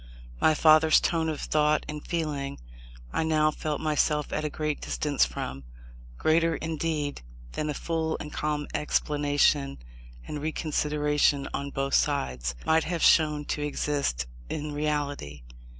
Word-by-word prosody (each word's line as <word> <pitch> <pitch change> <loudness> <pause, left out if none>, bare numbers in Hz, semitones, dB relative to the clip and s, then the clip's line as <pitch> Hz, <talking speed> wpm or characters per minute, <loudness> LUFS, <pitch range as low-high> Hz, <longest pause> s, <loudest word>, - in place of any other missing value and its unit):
My 155 - +4
father's 155 0 +6
tone 165 -1 0
of 155 - -3
thought 150 0 +2
and 150 0 -6
feeling, 150 -5 -3 0.6
I - - +1
now 155 -1 +3
felt 150 -1 -3
myself 150 -1 0
at 155 - -1
a 150 - -1
great 150 0 -3
distance 60 -3 +1
from: 65 +2 -5 0.5
greater, 165 - +2
indeed, 155 -2 -2 0.3
than 155 - -3
a 150 - -2
full 160 0 -1
and 150 - -7
calm 150 -1 -1
explanation 145 -1 +1 0.5
and 150 - -5
reconsideration 150 -2 +1
on 140 0 -3
both 135 0 -2
sides, 65 - 0
might 160 0 +3
have 170 -1 -2
shown 150 -2 +4
to 150 - -4
exist 145 - -1 0.2
in 150 0 -3
reality. 145 - -2
150 Hz, 135 wpm, -27 LUFS, 145-155 Hz, 0.6 s, father's